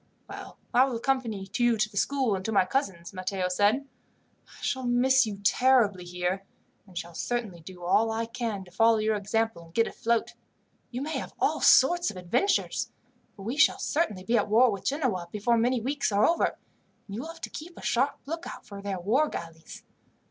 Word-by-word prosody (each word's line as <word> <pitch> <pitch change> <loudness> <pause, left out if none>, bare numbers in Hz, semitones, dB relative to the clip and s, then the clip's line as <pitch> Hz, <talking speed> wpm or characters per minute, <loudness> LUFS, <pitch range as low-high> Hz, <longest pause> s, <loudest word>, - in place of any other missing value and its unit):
"Well, - - -9 0.2
I 250 +2 +6
will 265 -3 -3
accompany 230 -5 -1
you 240 -1 +3
to 215 0 +2
the 215 - -18
school 260 +1 +1
and 190 -1 -3
to 225 - -1
my 195 -3 +4
cousin's," 185 -7 -2
Matteo 185 0 -2
said. 210 +9 +2 0.6
"I - - -21
shall 260 -2 -1
miss 255 +1 +4
you 205 -2 -5
terribly 220 -4 +3
here, 180 +2 -2 0.4
and 180 -2 -12
shall 170 0 -5
certainly 220 -2 -3
do 180 +2 -11
all 215 +6 +3
I 225 +1 -1
can 230 -4 -4
to 180 - -17
follow 225 +4 +4
your 215 0 +1
example, 215 -2 -1
and 165 - -19
get 230 - +4
afloat. 235 0 -1 0.6
You 250 +2 -4
may 310 +2 -2
have - - -8
all - - +1
sorts 345 +6 +5
of 190 - -8
adventures, 185 - 0 0.4
for 195 - -11
we 235 +7 -3
shall 330 - +5
certainly 215 - -1
be 230 +3 +2
at 205 - -2
war 235 +3 +5
with 200 -2 -6
Genoa 255 - -1
before 215 +3 +1
many 245 +2 +2
weeks 270 +1 -1
are 205 +1 +4
over, 335 - +3 0.6
and 200 - -8
you 230 - -3
will 310 - -7
have 330 0 -10
to - - -6
keep 340 +3 -9
a - - -10
sharp 270 +4 +1
lookout 330 +4 -6
for 200 -4 -9
their 200 -2 -3
war 255 - +2
galleys. 165 -1 -8
225 Hz, 200 wpm, -28 LUFS, 195-260 Hz, 0.6 s, I